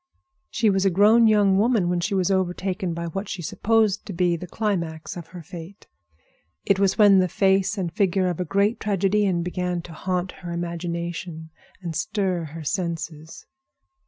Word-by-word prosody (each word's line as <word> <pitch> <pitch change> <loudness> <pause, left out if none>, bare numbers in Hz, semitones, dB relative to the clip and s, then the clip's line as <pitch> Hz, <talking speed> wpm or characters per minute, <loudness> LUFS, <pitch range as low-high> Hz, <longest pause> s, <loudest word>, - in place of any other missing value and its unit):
She 215 -2 +2
was 190 -1 +1
a 195 - +4
grown 215 +5 +5
young 205 -3 +4
woman 220 -4 +2
when 175 0 0
she 200 +3 -1
was 185 0 +1
overtaken 185 -1 -1
by 170 0 -4
what 195 +5 -5
she 180 - -5
supposed 215 +3 +1
to 200 - -5
be 175 0 +1
the 180 +2 -7
climax 170 -6 -3
of 170 -2 -8
her 175 0 -10
fate. 175 +5 -10 0.8
It 200 -1 +2
was 195 -1 +2
when 205 -3 +7
the 185 - +3
face 195 +2 +2
and 175 -3 -3
figure 190 0 +1
of 180 -2 -2
a - - +1
great 200 +5 +1
tragedian 195 -2 +1
began 180 -1 -2
to 170 - -10
haunt 180 +2 -2
her 175 -2 -6
imagination 170 -1 -5 0.3
and 170 -2 -4
stir 180 0 -1
her 160 +1 -8
senses. 160 -1 -4
185 Hz, 175 wpm, -24 LUFS, 170-200 Hz, 0.8 s, when